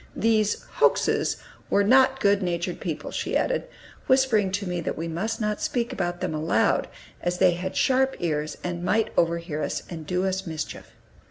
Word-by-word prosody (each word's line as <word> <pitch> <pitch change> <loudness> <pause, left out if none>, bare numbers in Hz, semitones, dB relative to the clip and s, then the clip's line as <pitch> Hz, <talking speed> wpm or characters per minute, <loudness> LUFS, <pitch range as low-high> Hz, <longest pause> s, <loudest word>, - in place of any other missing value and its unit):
These 215 -2 +1 0.2
"Hokeses" - - +3 0.3
were 200 - +3
not 265 +4 +5
good 200 -2 +3
natured 175 -1 -2
people, 155 -3 -4
she - - -1
added, - - 0 0.4
whispering 260 -7 +3
to 200 0 -1
me 175 -1 -2
that - - -3
we 165 +2 -3
must 180 +8 -2
not 210 -1 -1
speak 240 -2 -1
about 175 0 -2
them - - -1
aloud, 155 +2 +1 0.3
as 175 0 -1
they 180 - +5
had 180 +2 -4
sharp 265 0 +2
ears, 155 -3 -2
and 175 -1 -3
might 220 +4 +1
overhear 170 -2 0
us, - - -2
and 160 -3 -7
do 180 +1 0
us 190 0 -2
mischief. 160 -1 -6
180 Hz, 175 wpm, -25 LUFS, 170-215 Hz, 0.4 s, not